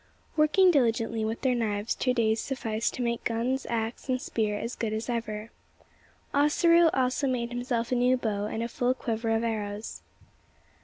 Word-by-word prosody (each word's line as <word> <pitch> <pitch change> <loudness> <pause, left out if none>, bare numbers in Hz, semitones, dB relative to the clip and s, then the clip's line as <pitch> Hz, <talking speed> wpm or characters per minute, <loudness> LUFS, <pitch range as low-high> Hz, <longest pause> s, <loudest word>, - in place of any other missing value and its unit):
Working 340 +5 +5
diligently 230 -5 +1
with 220 +1 -3
their 260 -2 +2
knives 215 -2 -1
two 255 -1 0
days 220 -2 +2
sufficed 230 -4 -2
to 250 - -2
make 235 -1 -1
guns, 245 +3 -1
axe, 230 +3 -3
and 255 0 +1
spear 215 -4 -1
as 235 +4 -4
good 220 -2 -2
as 220 +1 -3
ever. 225 -2 -4 0.8
Ossaroo 335 +4 +5
also 260 +2 +1
made 240 -2 -1
himself 240 -1 -2
a - - +3
new 250 +1 +3
bow 210 -4 -2
and 220 +1 -3
a - - -1
full 245 +2 0
quiver 225 -2 -2
of 225 0 +1
arrows. 210 -2 -4
235 Hz, 170 wpm, -28 LUFS, 220-255 Hz, 0.8 s, Working